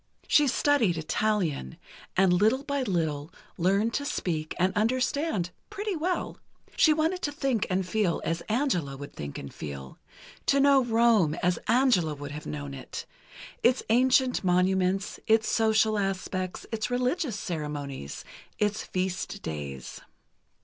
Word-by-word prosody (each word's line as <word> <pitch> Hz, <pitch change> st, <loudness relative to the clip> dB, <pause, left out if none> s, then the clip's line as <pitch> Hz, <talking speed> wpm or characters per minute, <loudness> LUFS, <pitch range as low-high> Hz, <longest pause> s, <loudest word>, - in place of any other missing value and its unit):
She 295 Hz, -1 st, +5 dB
studied 245 Hz, -, +2 dB
Italian, 160 Hz, -, -1 dB, 0.4 s
and 190 Hz, -1 st, +5 dB
little 220 Hz, +9 st, +3 dB
by 280 Hz, -1 st, -1 dB
little, 160 Hz, -, -1 dB, 0.2 s
learned 200 Hz, +6 st, +1 dB
to 285 Hz, -, -1 dB
speak 160 Hz, -, -2 dB
and 185 Hz, +1 st, +2 dB
understand, 240 Hz, -, 0 dB, 0.2 s
pretty 410 Hz, -1 st, -3 dB
well. 350 Hz, +3 st, -2 dB, 0.4 s
She 315 Hz, -, +5 dB
wanted 320 Hz, +4 st, +1 dB
to 290 Hz, -, -1 dB
think 270 Hz, -7 st, 0 dB
and 185 Hz, 0 st, 0 dB
feel 195 Hz, -4 st, +1 dB
as 165 Hz, 0 st, -1 dB
Angela 195 Hz, -, 0 dB
would 145 Hz, +1 st, -9 dB
think 70 Hz, -1 st, -6 dB
and 70 Hz, -, -8 dB
feel... 70 Hz, -3 st, -8 dB, 0.5 s
to 275 Hz, -, +4 dB
know 275 Hz, -1 st, +5 dB
Rome 225 Hz, -8 st, +3 dB
as 175 Hz, -1 st, +2 dB
Angela 225 Hz, -, +3 dB
would 145 Hz, 0 st, -7 dB
have 150 Hz, +1 st, -7 dB
known 70 Hz, -2 st, -5 dB
it—its 245 Hz, -, -3 dB
ancient 255 Hz, +1 st, +3 dB
monuments, 185 Hz, +1 st, +1 dB
its 220 Hz, 0 st, +4 dB
social 220 Hz, -1 st, +3 dB
aspects, 185 Hz, -1 st, -3 dB
its 220 Hz, 0 st, -2 dB
religious 250 Hz, -, 0 dB
ceremonies, 145 Hz, -, -5 dB, 0.3 s
its 210 Hz, +1 st, 0 dB
feast 185 Hz, +2 st, -3 dB
days. 70 Hz, -4 st, -6 dB
200 Hz, 135 wpm, -28 LUFS, 165-250 Hz, 0.5 s, She